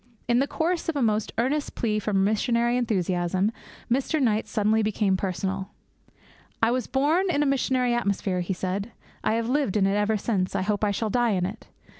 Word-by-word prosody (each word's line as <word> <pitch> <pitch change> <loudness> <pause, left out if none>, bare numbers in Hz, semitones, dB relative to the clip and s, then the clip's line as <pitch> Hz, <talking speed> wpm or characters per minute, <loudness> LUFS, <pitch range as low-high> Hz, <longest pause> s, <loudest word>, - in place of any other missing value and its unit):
In 240 0 +3
the 275 - +2
course 335 +2 -1
of 325 - -1
a 280 - 0
most 215 -1 +1
earnest 275 +5 0
plea 215 -2 0
for 210 - -3
missionary 235 +5 +2
enthusiasm, 190 -4 0 0.4
Mr. 270 +5 0
Knight 220 -5 +1
suddenly 220 0 +2
became 210 -2 +1
personal. 190 +1 -3 0.9
'I 225 - +5
was 250 0 -1
born 315 +8 +2
in 295 -4 +2
a - - 0
missionary 260 -3 +1
atmosphere,' 200 -5 0
he 180 +2 -2
said. 195 +5 -3 0.3
'I 215 - +2
have 230 0 0
lived 260 -6 +1
in 195 - +3
it 195 - +2
ever 210 +1 +1
since; 195 -3 -1
I 190 - +1
hope 205 +1 -1
I 210 - +3
shall 210 +2 -1
die 240 -1 +2
in 180 -2 0
it. 205 +5 -7
220 Hz, 195 wpm, -25 LUFS, 195-250 Hz, 0.9 s, I